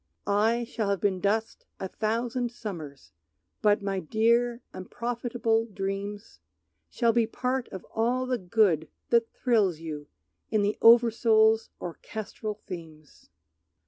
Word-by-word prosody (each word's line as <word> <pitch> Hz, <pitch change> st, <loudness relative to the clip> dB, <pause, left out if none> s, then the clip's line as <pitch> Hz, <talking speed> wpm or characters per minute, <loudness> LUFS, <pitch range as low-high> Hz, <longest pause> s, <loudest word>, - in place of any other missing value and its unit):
I 220 Hz, +4 st, +2 dB
shall 225 Hz, -3 st, -3 dB
have 200 Hz, -2 st, +1 dB
been 190 Hz, -1 st, +1 dB
dust 220 Hz, +4 st, -1 dB
a 190 Hz, -, -3 dB
thousand 235 Hz, +4 st, -1 dB
summers, 155 Hz, -, -8 dB, 0.5 s
But 210 Hz, 0 st, +3 dB
my 195 Hz, -1 st, -1 dB
dear 235 Hz, +6 st, +1 dB
unprofitable 230 Hz, +2 st, -1 dB
dreams 200 Hz, +1 st, -5 dB, 0.5 s
Shall 235 Hz, -2 st, +2 dB
be 230 Hz, -1 st, +3 dB
part 250 Hz, +2 st, -2 dB
of 190 Hz, -, -8 dB
all 245 Hz, +3 st, +1 dB
the 255 Hz, -1 st, -1 dB
good 180 Hz, -5 st, +2 dB, 0.2 s
that 235 Hz, -1 st, +3 dB
thrills 210 Hz, -, +2 dB
you 155 Hz, -2 st, -7 dB, 0.4 s
In 215 Hz, -2 st, +2 dB
the 205 Hz, +1 st, +1 dB
oversoul's 225 Hz, -1 st, +5 dB
orchestral 210 Hz, +5 st, -6 dB
themes. 160 Hz, -, -10 dB
220 Hz, 120 wpm, -28 LUFS, 195-235 Hz, 0.5 s, oversoul's